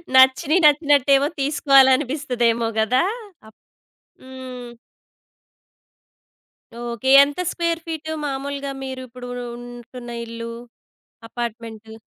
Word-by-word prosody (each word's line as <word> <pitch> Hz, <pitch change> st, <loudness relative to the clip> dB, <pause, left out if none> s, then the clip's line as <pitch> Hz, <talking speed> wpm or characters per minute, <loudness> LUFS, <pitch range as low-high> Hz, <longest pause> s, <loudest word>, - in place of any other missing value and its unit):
నచ్చిన 265 Hz, +4 st, +5 dB
నచ్చినట్టేమో 285 Hz, -2 st, +4 dB
తీసుకోవాలి 275 Hz, -2 st, +4 dB
అనిపిస్తదేమో 245 Hz, -5 st, -1 dB
గదా! 250 Hz, +7 st, +2 dB, 0.4 s
అప్ 220 Hz, -, -20 dB, 0.6 s
హ్మ్. 255 Hz, -2 st, -9 dB, 2.1 s
ఓకే. 240 Hz, +1 st, -3 dB
ఎంత 290 Hz, +5 st, -4 dB
స్క్వేర్ 335 Hz, -1 st, -1 dB
ఫీట్ 315 Hz, -1 st, -6 dB, 0.2 s
మామూలుగా 280 Hz, 0 st, -4 dB
మీరు 260 Hz, -1 st, -6 dB
ఇప్పుడు 245 Hz, +1 st, -10 dB, 0.3 s
ఉంటున్న 240 Hz, 0 st, -10 dB, 0.2 s
ఇల్లు, 230 Hz, 0 st, -7 dB, 0.8 s
అపార్ట్‌మెంటు. 225 Hz, -2 st, -7 dB
260 Hz, 85 wpm, -21 LUFS, 240-280 Hz, 2.1 s, నచ్చిన